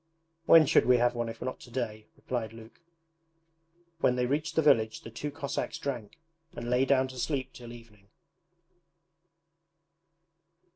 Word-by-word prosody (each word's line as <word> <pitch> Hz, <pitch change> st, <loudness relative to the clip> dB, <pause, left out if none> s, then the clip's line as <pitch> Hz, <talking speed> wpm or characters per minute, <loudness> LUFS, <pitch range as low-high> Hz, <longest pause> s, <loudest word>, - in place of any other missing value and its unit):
'When 165 Hz, -1 st, +8 dB
should -, -, +3 dB
we 125 Hz, -1 st, +6 dB
have 120 Hz, 0 st, +2 dB
one 120 Hz, -1 st, -2 dB
if 115 Hz, +1 st, -7 dB
not 130 Hz, 0 st, -4 dB
to -, -, -13 dB
day?' 110 Hz, -4 st, -4 dB
replied 115 Hz, -3 st, -4 dB
Luke. 115 Hz, +6 st, -14 dB, 1.2 s
When 125 Hz, -, +3 dB
they 125 Hz, 0 st, +1 dB
reached 155 Hz, +5 st, -1 dB
the 160 Hz, -, +4 dB
village 110 Hz, -7 st, +3 dB
the 115 Hz, -, -10 dB
two 145 Hz, +6 st, -5 dB
Cossacks 140 Hz, -1 st, -4 dB
drank, 135 Hz, +1 st, -5 dB, 0.4 s
and 120 Hz, -, -6 dB
lay 125 Hz, +2 st, +3 dB
down 130 Hz, -1 st, +3 dB
to 130 Hz, -1 st, -9 dB
sleep 135 Hz, -2 st, -2 dB
till 120 Hz, -1 st, -10 dB
evening. 110 Hz, -4 st, -15 dB
125 Hz, 150 wpm, -29 LUFS, 115-140 Hz, 1.2 s, When